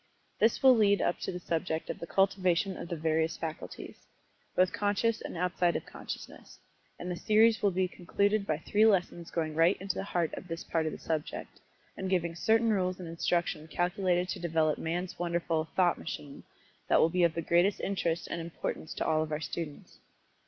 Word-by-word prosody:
This 225 +5 +3
will 260 -1 +8
lead 205 -3 +4
up 175 - 0
to - - -3
the 180 - -5
subject 165 -1 -2
of - - -8
the 170 - -6
cultivation 190 -1 +2
of - - -7
the 170 - -2
various 160 0 0
faculties 160 -1 -7 0.5
both 185 0 +3
conscious 210 +2 +1
and - - -6
outside 175 0 +1
of - - -3
consciousness, - - -9 0.4
and 180 - -5
the - - -2
series 220 +5 +4
will 205 - +4
be 185 0 +1
concluded 200 +3 0
by 155 - +1
three 205 +6 +1
lessons 180 -5 +2
going 160 -2 -2
right 165 +4 +3
to 195 - -7
the - - -3
heart 175 -4 -1
of - - -7
this 165 0 -5
part 160 -1 -1
of - - -1
the - - -6
subject, 155 -2 -4 0.4
and 190 - -4
giving 170 -3 +1
certain 225 +6 +3
rules 185 -2 0
and 180 - -6
instruction 165 -1 -1
calculated 180 +1 0
to 190 - -3
develop 160 -3 +1
Man's 175 +3 -3
wonderful 170 -2 0
"thought 180 -2 +3
machine" 145 -3 -7 0.4
that - - +4
will 160 - +5
be 180 +2 0
of 170 -2 +3
the 165 - -2
greatest 175 +5 +3
interest 170 -4 -1
and 170 - -4
importance 165 -1 -5
to - - -2
all 155 -1 +2
of 155 0 -3
our 150 - -1
students. 160 -2 -6
175 Hz, 195 wpm, -30 LUFS, 165-190 Hz, 0.5 s, will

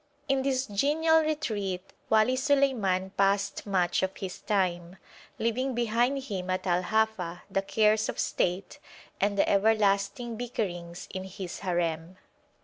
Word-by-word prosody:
In 270 -1 +2
this 265 -1 0
genial 310 +9 +3
retreat 205 - -3 0.2
Wali 220 +3 +4
Suleiman 255 -10 +1
passed 200 +1 0
much 180 -3 +1
of 190 0 -2
his 185 -2 -6
time, 180 -3 -1 0.4
leaving 250 +3 -1
behind 240 +4 +1
him 190 -8 -4
at 185 0 -1
Al 180 -1 +2
Hafa 220 -4 -1
the 195 - +1
cares 215 +2 +2
of - - -4
state 180 +2 -1 0.4
and 200 0 +1
the - - +3
everlasting 205 +2 +2
bickerings 180 -8 -4
in 190 0 -4
his 190 -1 -7
harem. 170 -1 -2
200 Hz, 135 wpm, -28 LUFS, 185-240 Hz, 0.4 s, Wali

